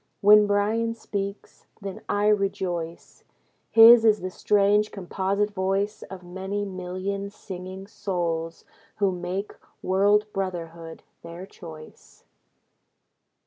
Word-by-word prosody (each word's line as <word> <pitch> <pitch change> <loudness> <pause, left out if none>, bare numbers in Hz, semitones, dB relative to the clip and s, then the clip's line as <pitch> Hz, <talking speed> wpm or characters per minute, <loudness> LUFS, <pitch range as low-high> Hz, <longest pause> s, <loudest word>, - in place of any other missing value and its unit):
When 210 +1 +7
Bryan 220 +3 +1
speaks, 200 -2 -6
then 195 -3 -7
I 205 0 +1
rejoice. 190 -5 -2 0.5
His 230 +1 +9
is 215 -2 +4
the 185 +1 -4
strange 205 +2 +2
composite 195 +2 -2
voice 195 +1 -1
Of 190 -1 -9
many 190 +3 -4
million 190 +1 -4
singing 190 -1 -9
souls 170 -5 -3 0.3
Who 200 -2 +1
make 180 +3 -4 0.3
world 205 +3 +3
brotherhood 170 -4 -5 0.2
their 170 +2 -9
choice. 160 -5 -13
195 Hz, 100 wpm, -25 LUFS, 180-205 Hz, 0.5 s, His